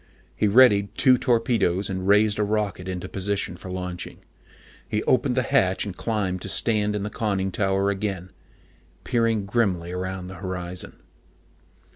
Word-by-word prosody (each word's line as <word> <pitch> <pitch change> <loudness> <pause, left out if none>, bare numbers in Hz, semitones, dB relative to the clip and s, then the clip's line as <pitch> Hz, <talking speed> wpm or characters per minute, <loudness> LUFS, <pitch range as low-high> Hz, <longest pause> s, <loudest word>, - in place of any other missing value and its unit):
He 105 - +1
readied 100 -3 +5
two 130 -2 +5
torpedoes 115 -7 +1
and 95 -1 -3
raised 105 +1 +4
a - - +3
rocket 100 -3 -2
into 90 -1 -4
position 95 -2 -2
for 90 - -10
launching. 90 -1 -5 0.7
He 105 - -1
opened 130 0 +1
the 130 - +3
hatch 95 -4 +1
and 100 -3 -6
climbed 95 -5 -2
to 100 - -6
stand 105 +2 +2
in 105 - -2
the 105 - -4
conning 100 -4 -1
tower 95 +1 +1
again, 95 -2 -4 0.7
peering 115 -4 +1
grimly 95 -6 0
around 95 0 -4
the 95 0 -9
horizon. 90 -2 -5
100 Hz, 150 wpm, -24 LUFS, 95-110 Hz, 0.7 s, readied